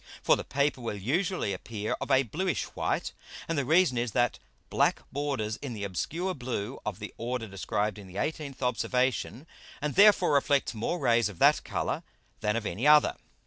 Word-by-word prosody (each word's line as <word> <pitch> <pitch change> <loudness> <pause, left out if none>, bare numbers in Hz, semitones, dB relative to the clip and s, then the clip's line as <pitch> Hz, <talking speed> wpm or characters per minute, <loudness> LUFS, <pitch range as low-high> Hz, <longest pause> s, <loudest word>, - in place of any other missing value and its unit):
For - - +5
the - - -5
Paper 140 -1 0
will 115 -3 -3
usually 155 - 0
appear 105 +3 -4
of - - -4
a 135 -1 +5
bluish 175 - -1
white; - - -1 0.3
and 165 - -1
the 140 - +1
reason 160 -4 +4
is, 120 -3 -2
that 120 - +1 0.3
black - - +2
borders 135 -7 -2
in 135 -4 -6
the 105 -2 -5
obscure 165 - -2
blue 125 - -4
of 105 -3 -4
the 105 -1 -7
order 120 0 -2
described 105 +2 -2
in 100 - -11
the 90 - -13
18th 145 +3 -3
Observation, 125 +2 0 0.3
and 150 -1 -2
therefore 200 -5 +6
reflects 140 -2 +2
more 115 +10 -2
Rays 115 -7 +2
of 100 - -11
that - - +4
Colour - - -2 0.4
than 105 0 0
of 115 -2 -2
any 110 +11 -1
other. 150 0 +6
125 Hz, 185 wpm, -29 LUFS, 105-145 Hz, 0.4 s, therefore